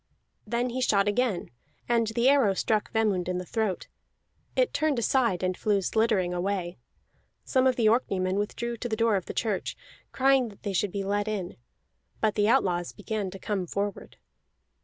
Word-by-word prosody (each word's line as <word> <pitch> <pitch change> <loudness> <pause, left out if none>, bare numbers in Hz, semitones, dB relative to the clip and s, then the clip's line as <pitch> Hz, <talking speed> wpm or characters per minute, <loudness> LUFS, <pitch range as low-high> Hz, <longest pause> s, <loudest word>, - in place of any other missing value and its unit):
Then 240 +2 -1
he 255 +2 -3
shot 200 -5 +3
again, 205 - 0 0.4
and 235 -1 +2
the 235 +3 +1
arrow 265 -8 +4
struck 215 +2 0
Vemund 205 -5 +1
on 180 - -1
the 180 - -4
throat; 215 -2 -2 0.7
it - - +2
turned 305 -3 +1
aside, 235 -6 +1
and 185 0 0
flew 210 +1 +1
sliddering 195 -3 +1
away. 180 -1 -2 0.7
Some 260 -1 +3
of 255 - +3
the 235 - +1
Orkneymen 195 -5 +1
withdrew 235 +3 -3
to 240 +1 -4
the 220 - 0
door 225 -1 +2
of 190 - -2
the - - -6
church, 210 -5 -2 0.3
crying 265 -2 +3
that 200 - -17
they 200 -2 -2
should 195 +1 0
be 200 0 -3
let 205 +2 -1
in. 200 -5 -3 0.6
But 215 -1 +2
the 210 0 +2
outlaws 180 -8 +1
began 210 -1 -3
to 195 - -9
come 195 -2 -3
forward. 200 +3 -4
210 Hz, 180 wpm, -27 LUFS, 190-235 Hz, 0.7 s, arrow